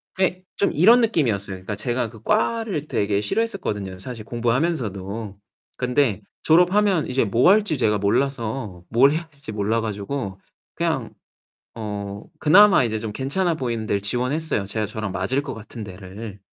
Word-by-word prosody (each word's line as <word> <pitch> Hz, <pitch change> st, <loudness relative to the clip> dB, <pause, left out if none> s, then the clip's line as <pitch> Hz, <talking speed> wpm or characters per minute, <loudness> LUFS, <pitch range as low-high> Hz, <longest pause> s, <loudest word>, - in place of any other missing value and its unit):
그게 185 Hz, -1 st, 0 dB
좀 200 Hz, -, +1 dB
이런 225 Hz, +10 st, +6 dB
느낌이었어요. 115 Hz, -, 0 dB
그러니까 95 Hz, +3 st, -5 dB
제가 120 Hz, +1 st, -1 dB
그 110 Hz, -1 st, -15 dB
과를 215 Hz, -, 0 dB
되게 100 Hz, -5 st, 0 dB
싫어했었거든요, 105 Hz, -, -2 dB
사실 115 Hz, +3 st, -7 dB
공부하면서도. 115 Hz, -, -2 dB, 0.4 s
근데 125 Hz, -4 st, +1 dB, 0.2 s
졸업하면 180 Hz, +2 st, +4 dB
이제 130 Hz, -2 st, +1 dB
뭐 115 Hz, -, +4 dB
할지 205 Hz, -7 st, +3 dB
제가 105 Hz, -4 st, +2 dB
몰라서 110 Hz, -2 st, -1 dB
뭘 130 Hz, +5 st, +5 dB
해야 160 Hz, +2 st, -2 dB
될지 145 Hz, -6 st, -10 dB
몰라 110 Hz, +2 st, 0 dB
가지고 105 Hz, -1 st, -4 dB, 0.3 s
그냥 -, -, -2 dB, 0.6 s
어 100 Hz, -2 st, -5 dB, 0.2 s
그나마 195 Hz, +2 st, +7 dB
이제 110 Hz, -2 st, -1 dB
좀 110 Hz, 0 st, -4 dB
괜찮아 165 Hz, -, 0 dB
보이는 115 Hz, -6 st, -3 dB
데를 100 Hz, -, +1 dB
지원했어요, 125 Hz, +3 st, -1 dB
제가 110 Hz, +2 st, -2 dB
저랑 110 Hz, 0 st, -4 dB
맞을 95 Hz, +9 st, 0 dB
것 145 Hz, -, -6 dB
같은 110 Hz, 0 st, -8 dB
데를. 100 Hz, +2 st, -9 dB
115 Hz, 350 characters per minute, -23 LUFS, 105-155 Hz, 0.6 s, 그나마